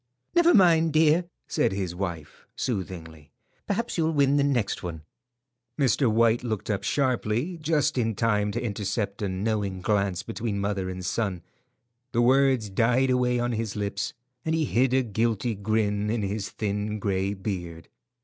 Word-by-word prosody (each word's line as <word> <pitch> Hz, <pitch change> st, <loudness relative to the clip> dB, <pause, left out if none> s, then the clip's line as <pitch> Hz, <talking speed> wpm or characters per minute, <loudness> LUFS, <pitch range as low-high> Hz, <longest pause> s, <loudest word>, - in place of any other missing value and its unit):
"Never 345 Hz, 0 st, +5 dB
mind, 165 Hz, -5 st, +5 dB
dear," 160 Hz, +2 st, +4 dB, 0.2 s
said 150 Hz, -10 st, +1 dB
his 95 Hz, -3 st, -3 dB
wife, 85 Hz, -5 st, -6 dB
soothingly; 85 Hz, -, -5 dB, 0.4 s
"perhaps 215 Hz, -1 st, -1 dB
you'll 160 Hz, -1 st, +2 dB
win 140 Hz, -1 st, +3 dB
the 140 Hz, -, +3 dB
next 130 Hz, -7 st, 0 dB
one." 80 Hz, -3 st, -6 dB, 0.7 s
Mr. 130 Hz, -2 st, +2 dB
White 115 Hz, +1 st, +3 dB
looked 110 Hz, -3 st, -2 dB
up 100 Hz, -, -1 dB
sharply, 130 Hz, +4 st, 0 dB
just 155 Hz, -4 st, +1 dB
in 115 Hz, -2 st, 0 dB
time 105 Hz, -2 st, +1 dB
to -, -, -1 dB
intercept 100 Hz, -2 st, -3 dB
a 100 Hz, -, -1 dB
knowing 100 Hz, 0 st, -2 dB
glance 100 Hz, -1 st, 0 dB
between 110 Hz, -2 st, -3 dB
mother 100 Hz, -2 st, -1 dB
and 90 Hz, 0 st, -6 dB
son. 95 Hz, -6 st, -2 dB, 0.7 s
The 120 Hz, -, +3 dB
words 130 Hz, -4 st, +3 dB
died 125 Hz, +6 st, +2 dB
away 125 Hz, -1 st, +2 dB
on 120 Hz, 0 st, 0 dB
his 115 Hz, -2 st, -3 dB
lips, 100 Hz, -1 st, -3 dB, 0.3 s
and 160 Hz, 0 st, 0 dB
he 160 Hz, -1 st, +1 dB
hid 130 Hz, 0 st, +2 dB
a 130 Hz, -, +3 dB
guilty 115 Hz, +1 st, 0 dB
grin 105 Hz, 0 st, 0 dB
in 110 Hz, -1 st, -1 dB
his 100 Hz, 0 st, -3 dB
thin 105 Hz, +1 st, -2 dB
grey 100 Hz, -1 st, -1 dB
beard. 90 Hz, -4 st, -5 dB
110 Hz, 160 wpm, -26 LUFS, 100-130 Hz, 0.7 s, Never